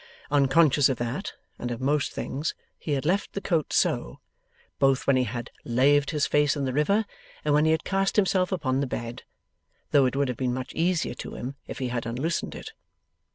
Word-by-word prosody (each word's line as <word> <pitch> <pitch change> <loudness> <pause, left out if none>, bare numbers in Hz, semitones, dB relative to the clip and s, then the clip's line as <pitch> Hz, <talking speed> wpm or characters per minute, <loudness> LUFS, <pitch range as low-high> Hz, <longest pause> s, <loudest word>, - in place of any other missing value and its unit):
Unconscious 145 0 +4
of 130 - -1
that, 120 - -3 0.3
and 120 - -3
of 120 -1 -4
most 140 +2 +1
things, 150 +4 -3 0.2
he 150 - -2
had 140 0 -1
left 190 +5 0
the - - -2
coat 165 -6 0
so, - - 0 0.6
both 135 -1 +3
when 140 - +4
he 130 -1 +2
had 120 +2 -5
laved 140 +4 +3
his 150 -3 +1
face 145 0 +2
in 140 - -1
the 130 - -2
river, 200 +10 +2 0.4
and 150 - +3
when 150 +1 +4
he 160 - +4
had 160 0 +1
cast 195 0 0
himself 190 -2 +2
upon 135 -8 0
the 140 - 0
bed; 120 -1 -5 0.7
though 140 -2 +5
it 125 - -3
would 140 0 +1
have 125 -2 -3
been 125 -2 -1
much 130 -1 -5
easier 170 -4 0
to - - -8
him 130 +3 -5
if - - -6
he 130 -2 -2
had 120 -1 -3
unloosened 135 +8 -2
it. - - -8
140 Hz, 205 wpm, -26 LUFS, 130-160 Hz, 0.7 s, though